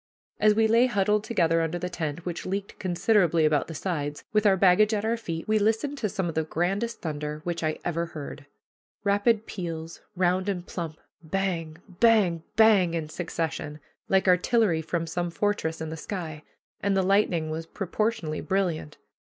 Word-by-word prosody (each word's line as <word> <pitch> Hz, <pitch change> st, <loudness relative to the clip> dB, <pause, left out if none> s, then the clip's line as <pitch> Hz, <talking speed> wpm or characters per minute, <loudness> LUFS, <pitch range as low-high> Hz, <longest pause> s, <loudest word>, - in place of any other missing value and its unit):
As 210 Hz, 0 st, +5 dB
we 225 Hz, 0 st, +4 dB
lay 230 Hz, +3 st, +5 dB
huddled 210 Hz, -2 st, +1 dB
together 165 Hz, -7 st, +2 dB
under 165 Hz, +1 st, -1 dB
the 180 Hz, +1 st, -3 dB
tent, 165 Hz, -2 st, -4 dB
which 175 Hz, -2 st, -4 dB
leaked 195 Hz, +1 st, -4 dB
considerably 175 Hz, -2 st, +2 dB
about 150 Hz, -1 st, +2 dB
the 165 Hz, -, -7 dB
sides, 150 Hz, -4 st, -3 dB
with 215 Hz, 0 st, +4 dB
our 195 Hz, -1 st, +4 dB
baggage 200 Hz, +4 st, +5 dB
at 210 Hz, +1 st, -2 dB
our 230 Hz, +1 st, +1 dB
feet, 165 Hz, -8 st, -5 dB
we 215 Hz, 0 st, +3 dB
listened 225 Hz, +7 st, +1 dB
to 215 Hz, -, -1 dB
some 190 Hz, -2 st, -2 dB
of 165 Hz, -, -3 dB
the 160 Hz, -, 0 dB
grandest 195 Hz, +9 st, -2 dB
thunder 150 Hz, -1 st, -4 dB
which 170 Hz, -1 st, -3 dB
I 155 Hz, 0 st, 0 dB
ever 170 Hz, 0 st, -1 dB
heard 145 Hz, -2 st, -8 dB, 0.6 s
rapid 205 Hz, +2 st, +2 dB
peals, 165 Hz, -3 st, -6 dB
round 185 Hz, +2 st, +1 dB
and 180 Hz, -3 st, -3 dB
plump, 165 Hz, -5 st, -5 dB, 0.2 s
bang, 165 Hz, -2 st, -2 dB
bang, 195 Hz, -4 st, +3 dB
bang, 200 Hz, -6 st, +5 dB
in 155 Hz, -2 st, -3 dB
succession, 160 Hz, -2 st, -4 dB, 0.3 s
like 190 Hz, 0 st, +3 dB
artillery 180 Hz, -1 st, +3 dB
from 165 Hz, +1 st, -2 dB
some 175 Hz, +1 st, -2 dB
fortress 170 Hz, -3 st, -1 dB
in 160 Hz, 0 st, -4 dB
the -, -, -4 dB
sky; 160 Hz, -4 st, -5 dB, 0.4 s
and 200 Hz, -1 st, +1 dB
the 190 Hz, -, +3 dB
lightning 180 Hz, -5 st, +2 dB
was 160 Hz, +1 st, -4 dB
proportionally 195 Hz, -4 st, -2 dB
brilliant. 170 Hz, -3 st, -1 dB
180 Hz, 175 wpm, -27 LUFS, 160-205 Hz, 0.6 s, As